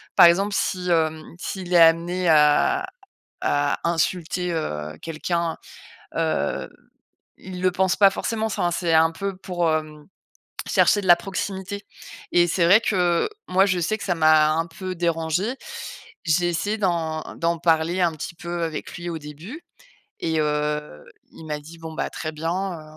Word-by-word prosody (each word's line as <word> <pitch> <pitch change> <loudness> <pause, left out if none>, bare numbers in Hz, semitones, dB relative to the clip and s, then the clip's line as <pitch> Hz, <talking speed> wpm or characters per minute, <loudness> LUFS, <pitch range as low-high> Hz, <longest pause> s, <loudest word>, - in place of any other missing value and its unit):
par - - +9
exemple, 195 +4 +2
si, 180 -1 -1
hem, 160 -1 +1 0.2
s'il 185 -1 -5
est - - +6
amené 170 +2 +4
à 155 - +4 0.6
à 145 0 +1
insulter, 175 +1 -1
heu, 75 - -4
quelqu'un, 165 +1 -2 0.6
heu, - - -1 0.7
il 185 -1 -8
le 185 - +4
pense 190 -1 +1
pas 200 0 +7
forcément. 220 +3 -2
Sin 180 -4 0
c'est 170 -1 0
un 160 0 +5
peu 195 +2 -4
pour, 175 -3 -1
hem, 155 -1 -3 0.6
chercher 205 - +4
de - - -6
la 175 - +9
proximité, 195 +2 -5 0.5
et 175 0 +5
c'est 170 0 +1
vrai 195 +6 +7
que, 180 -6 +1 0.2
moi, 190 +1 +4
je 185 -3 0
sais 195 +6 0
que - - -7
ça 180 - 0
m'a 155 -1 +5
un 165 +1 0
peu 185 +2 -6
dérangée. 170 +6 -1 0.7
J'ai 175 +1 +2
essayé 205 +6 -1
d'en 165 -5 -1
d'en 170 0 0
parler 165 +2 +1
un 170 -2 +3
petit 160 +4 -7
peu 170 0 -4
avec 160 -2 -5
lui 175 0 -6
au 165 - -4
début 155 - -10 0.6
et 160 -1 0
heu, 150 - -2 0.3
il 160 - -12
m'a 150 -1 -3
dit: 160 +3 -13
«Bon 160 -1 -8
bah, - - -2
très 155 - -5
bien, 160 +2 -3
heu, 185 -3 -3
170 Hz, 165 wpm, -23 LUFS, 160-185 Hz, 0.7 s, par